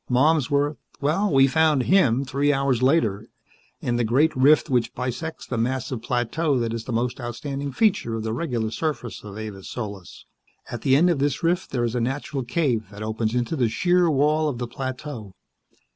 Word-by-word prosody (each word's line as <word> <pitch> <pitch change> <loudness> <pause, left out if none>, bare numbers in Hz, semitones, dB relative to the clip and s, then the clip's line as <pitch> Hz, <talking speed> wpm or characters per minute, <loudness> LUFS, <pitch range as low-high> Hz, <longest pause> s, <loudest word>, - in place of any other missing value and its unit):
Malmsworth 145 +1 +2 0.2
well, 165 +8 +1
we 135 -1 +6
found 150 -1 +3
him 135 -9 +3
three 140 +2 +1
hours 135 -3 +1
later 115 -7 +2 0.5
in 120 -1 -1
the 120 - +1
great 135 +8 +2
rift 140 +4 +5
which 125 -2 0
bisects 130 +6 -4
the 120 - -3
massive 130 0 -2
plateau 125 +5 0
that 115 -2 -1
is 115 -1 -5
the - - -5
most 120 +2 -1
outstanding 135 +4 -4
feature 205 - +1
of 110 - -4
the 110 0 -2
regular 120 -6 -2
surface 145 -5 -4
of 105 -1 -9
Avis 105 -3 -7
Solis. 100 -6 -7 0.5
At 120 - -5
the 135 -2 +3
end 175 +5 +4
of 160 - -1
this 140 +1 0
rift 175 +2 +1
there 120 -2 -1
is 115 -1 -1
a 125 - 0
natural 135 +3 -2
cave 120 - 0
that 105 +1 -8
opens 110 +1 -2
into 125 +5 -1
the 125 -6 +1
sheer 175 +6 +2
wall 150 +2 +2
of 130 - -4
the 120 - -3
plateau. 130 -5 -6
130 Hz, 190 wpm, -24 LUFS, 115-150 Hz, 0.5 s, we